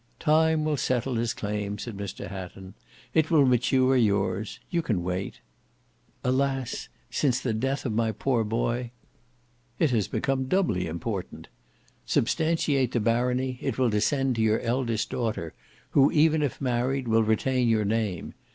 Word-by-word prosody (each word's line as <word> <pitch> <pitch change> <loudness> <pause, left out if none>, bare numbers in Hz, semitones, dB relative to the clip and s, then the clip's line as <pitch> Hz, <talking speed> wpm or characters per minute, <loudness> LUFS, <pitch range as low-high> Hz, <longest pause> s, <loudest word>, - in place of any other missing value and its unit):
"Time 160 0 +3
will 155 -2 0
settle 130 0 0
his 115 -1 0
claim," 105 -2 -3
said 115 +1 -6
Mr 100 0 -6
Hatton; 95 0 -8 0.4
"it 160 -1 +3
will 150 -4 +5
mature 130 +1 +3
yours. 100 -3 +1
You 170 -2 +1
can 105 - -1
wait." 90 +2 -4 0.8
"Alas! 135 0 -1 0.2
since 130 -4 +1
the 125 -3 -1
death 135 +5 -1
of 115 - -1
my 110 0 +1
poor 115 +2 0
boy—" 120 +2 -1 0.9
"It 155 -5 +2
has 110 -5 +1
become 135 -1 -1
doubly 130 - +1
important. 90 +4 -5 0.6
Substantiate 145 -2 +1
the 120 - +2
barony, 125 +3 0
it - - -2
will 125 -3 +2
descend 130 +4 +1
to - - +1
your 110 0 +3
eldest 115 -2 -1
daughter, 110 -9 -2 0.4
who, 140 -1 +5
even 155 0 +4
if 145 -4 -2
married, 130 +1 0
will 115 0 +4
retain 120 +3 +1
your 110 -2 +2
name. 105 -4 -2
120 Hz, 150 wpm, -27 LUFS, 110-135 Hz, 0.9 s, will